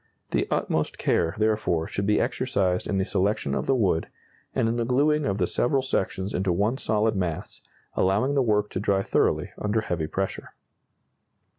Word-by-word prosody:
The - - +1
utmost - - -1
care, 85 +2 +1
therefore, 105 -6 +1
should 100 0 -2
be 105 - +3
exercised 95 -8 0
in 100 - 0
the 95 - +1
selection 95 -7 0
of - - -2
the 135 - +3
wood, 95 -9 +1 0.5
and - - +2
in 115 +1 0
the 120 - +1
glueing 145 +5 +2
of 100 -1 0
the 90 - +2
several 130 +8 +1
sections 95 -5 -1
into 95 0 0
one 105 +9 0
solid 110 0 +1
mass, 90 -4 -3 0.3
allowing 105 +9 +2
the 140 - +3
work 105 -3 +1
to - - -2
dry 100 -1 +1
thoroughly - - +1
under 105 +1 0
heavy 85 -7 -2
pressure. 95 +4 -4
105 Hz, 175 wpm, -26 LUFS, 95-115 Hz, 0.5 s, be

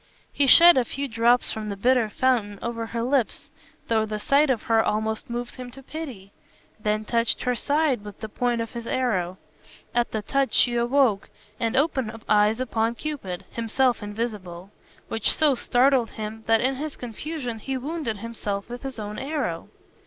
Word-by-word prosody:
He 280 - +2
shed 340 +4 +9
a 255 - +4
few 275 +4 -4
drops 235 +1 +2
from 215 -1 -4
the 200 - -3
bitter 240 +1 +3
fountain 220 -4 +1
over 230 -1 -3
her 230 0 -3
lips, 255 -1 0 0.4
though 220 -1 +2
the 215 0 -4
sight 280 +6 +3
of 245 -4 +1
her 225 -1 +3
almost 220 +1 -2
moved 240 +2 -5
him 250 -1 -7
to 270 +2 -12
pity; 260 -11 -8 0.5
then 215 0 -1
touched 230 +1 0
her 250 - +1
side 285 -2 +1
with 205 -2 -10
the 220 - -5
point 240 +2 -1
of 230 - -5
his 235 -1 -7
arrow. 190 -8 -1 0.6
At 240 0 +1
the 215 -1 -3
touch 275 +4 0
she 245 - +4
awoke, 240 -3 +2 0.3
and 230 +1 0
opened 260 -6 0
eyes 210 +2 +3
upon 230 -2 0
Cupid 235 -12 -5
(himself 235 +2 +1
invisible), 205 -4 -5 0.4
which 225 -2 0
so 305 -3 +4
startled 250 0 +2
him 220 +1 -7
that 225 0 +4
in 260 +1 0
his 300 +1 -5
confusion 245 0 -5
he 265 +4 -3
wounded 280 -4 -3
himself 205 -2 -5
with 245 +1 -7
his 270 -3 -6
own 210 -1 -5
arrow. 270 - -3
235 Hz, 175 wpm, -25 LUFS, 215-260 Hz, 0.6 s, shed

